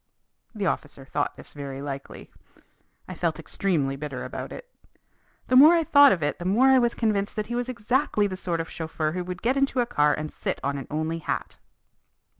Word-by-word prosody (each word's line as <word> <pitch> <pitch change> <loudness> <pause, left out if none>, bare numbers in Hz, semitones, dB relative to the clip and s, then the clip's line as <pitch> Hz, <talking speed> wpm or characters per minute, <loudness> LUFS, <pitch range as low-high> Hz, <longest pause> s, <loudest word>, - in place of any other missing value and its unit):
The 205 -2 -2
officer 145 -5 -3
thought 145 +2 -2
this - - -13
very 140 -2 -6
likely. 140 -1 -7 0.8
I - - -6
felt - - -1
extremely 150 -9 -1
bitter 140 -2 -6
about - - -6
it. - - -9 0.8
The 255 - +2
more 300 +6 +9
I 335 - +2
thought 285 -2 +7
of 170 -5 0
it 145 - -1
the 175 - -6
more 230 +8 +4
I 265 -1 +6
was 240 -1 +1
convinced 210 -3 0
that 215 - -2
he - - -1
was 245 +1 -2
exactly 245 -1 +1
the 190 -2 -2
sort 175 -3 -2
of 165 - -3
chauffeur 160 -1 -3
who 180 +2 -3
would 180 0 -7
get 255 +4 +2
into 275 -2 +1
a 245 - +3
car 150 -8 +2
and 155 0 -6
sit - - -3
on 140 0 -1
an 135 - -8
only 160 +2 -2
hat. - - -4
180 Hz, 210 wpm, -25 LUFS, 150-240 Hz, 0.8 s, more